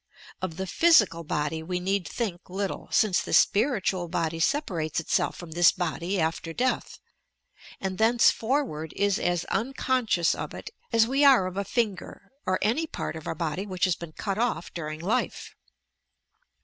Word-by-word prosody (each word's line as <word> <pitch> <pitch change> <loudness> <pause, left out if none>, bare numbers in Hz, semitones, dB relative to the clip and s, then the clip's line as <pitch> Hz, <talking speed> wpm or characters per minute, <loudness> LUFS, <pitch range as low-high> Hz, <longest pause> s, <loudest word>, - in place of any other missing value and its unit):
Of 180 -3 -4
the 190 - -2
physical 210 - +4
body 150 +1 -2
we 180 +2 -3
need 190 0 -1
think 185 -8 -4
little, 195 +1 -4
since 205 -4 +3
the - - -5
spiritual 200 -5 +2
body 165 -1 -2
separates 170 - 0
itself 165 - 0
from 175 -2 -9
this 175 +2 +5
body 175 +1 -2
after 165 0 -2
death, 255 +7 -1 0.8
and 190 0 -4
thenceforward 225 - +2
is 200 -1 +1
as 175 -1 0
unconscious 245 -7 +1
of - - -6
it - - -8 0.2
as 225 -1 +5
we 270 +4 +1
are 265 -9 +6
of 185 0 -5
a 200 - -1
finger 200 -2 -3 0.2
or 185 0 +2
any 255 +11 +1
part - - -5
of 160 - -8
our - - -2
body 165 +5 -3
which 185 -1 0
has 185 -2 +1
been 170 -2 -9
cut 200 +3 -3
off 240 -6 -1
during 155 -2 -5
life. 190 +6 -2
185 Hz, 160 wpm, -27 LUFS, 165-225 Hz, 0.8 s, are